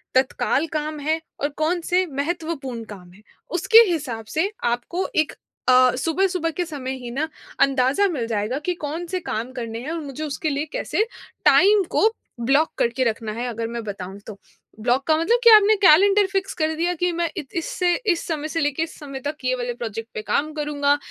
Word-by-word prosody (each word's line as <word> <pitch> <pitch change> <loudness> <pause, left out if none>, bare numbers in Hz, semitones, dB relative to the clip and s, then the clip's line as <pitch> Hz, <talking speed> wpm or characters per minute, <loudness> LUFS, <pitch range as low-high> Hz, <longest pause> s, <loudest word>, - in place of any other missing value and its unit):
तत्काल 265 +3 +1
काम 305 0 -5
हैं 315 +3 -1 0.2
और 285 - +1
कौन 335 +3 0
से 365 +2 +1
महत्वपूर्ण 285 -4 -3
काम 190 -5 -11
हैं। 205 +3 -19 0.3
उसके 360 +6 +4
हिसाब 255 -9 -3
से 370 +6 +1
आपको 245 +10 -1
एक 310 -1 +2 0.4
अ, 255 -1 +6
सुबह-सुबह 335 +4 0
के 355 - -2
समय 275 -5 -5
ही 240 - -5
ना, 290 +6 -1 0.3
अंदाज़ा 275 +7 +3
मिल 260 -8 -2
जाएगा 220 +3 -1
कि, 360 +4 -2
कौन 320 +1 -5
से 370 +2 -2
काम 240 -7 -4
करने 230 -3 -5
हैं 290 +6 -5
और 335 - -3
मुझे 285 0 -6
उसके 305 +1 -2
लिए 290 +1 -1
कैसे 430 - 0 0.4
टाइम 400 +2 +6
को - - +1 0.4
ब्लॉक 280 +5 +3
करके 235 +2 +1
रखना 225 -1 -2
है। 235 +3 -4
अगर 230 -1 -3
मैं 235 0 -5
बताऊँ 195 -1 -6
तो, 210 - -8 0.4
ब्लॉक 250 +4 +1
का 315 -1 +4
मतलब 400 +10 +2
कि - - +10
आपने 425 +1 +6
कैलेंडर 395 +5 +6
फ़िक्स 390 0 -1
कर 310 0 +2
दिया 345 +3 0
कि, 355 +2 0
"मैं 340 0 -1
इत 270 - -6
इससे 350 +1 0 0.2
इस 340 - -6
समय 310 -2 -2
से 330 +1 -1
लेके 290 +1 0
इस 325 - -8
समय 275 -3 -7
तक 305 - -5
ये 255 0 +2
वाले 245 -1 -3
प्रोजेक्ट 225 -1 -6
पे - - -3
काम 280 +9 0
करूँगा, 290 -1 +1
295 Hz, 200 wpm, -23 LUFS, 245-335 Hz, 0.4 s, कि